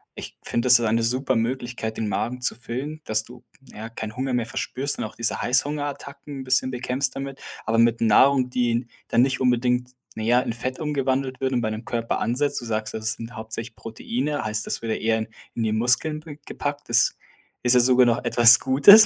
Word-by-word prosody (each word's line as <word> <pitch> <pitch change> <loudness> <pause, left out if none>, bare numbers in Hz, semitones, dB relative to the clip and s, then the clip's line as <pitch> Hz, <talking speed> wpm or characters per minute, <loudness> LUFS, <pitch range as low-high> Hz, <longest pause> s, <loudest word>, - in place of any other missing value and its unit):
Ich - - -9
finde, 120 +2 -2
das 125 -1 +10
ist 120 - -1
eine 115 +1 +1
supere 130 +4 0
Möglichkeit, 120 -1 -3
den 110 - -2
Magen 120 +5 -3
zu 125 - +2
füllen 135 +6 -6
dass 110 -3 0
du, 125 0 -15 0.3
ja, 110 +2 -8
keinen 110 -1 -7
Hunger 130 0 -3
mehr 120 -2 0
verspürst 135 +4 -2
und - - -4
auch 110 - -7
diese 115 0 0
Heißhungerattacken 145 +1 -2
'n - - -6
bisschen 130 0 +1
bekämpfst 125 +1 -2
damit. 135 0 -7 0.2
Aber 110 +1 0
mit 115 0 +3
Nahrung, 125 +4 +4
die 125 -1 0
n 120 +1 -2 0.2
dann 115 - +3
nicht 130 0 0
unbedingt, 125 0 +1 0.2
naja, 120 +3 +2
in - - -4
Fett 130 +3 -5
umgewandelt 135 -3 -2
wird 130 0 -1
und 120 - 0
bei 110 - -1
dem 110 +2 -6
Körper 115 -1 -2
ansetzt. 140 +5 -1
du 120 - -10
sagst, 110 -1 -3
das 110 0 -1
sind 115 +2 -10
hauptsächlich 110 0 -7
Proteine, 130 +6 -4
heißt 110 0 -2
das - - -3
würde 115 -1 -2
eher 110 0 0 0.4
in 115 - -2
die 110 - 0
Muskeln 125 +8 +2
w 150 -3 -9
gepackt. 145 -1 -5
Das 120 0 +3 0.5
ist 125 0 +5
ja - - +6
sogar 125 +1 +5
noch 120 +1 0
etwas 120 0 +8
Gutes, 145 +12 +8
125 Hz, 210 wpm, -23 LUFS, 115-130 Hz, 0.5 s, das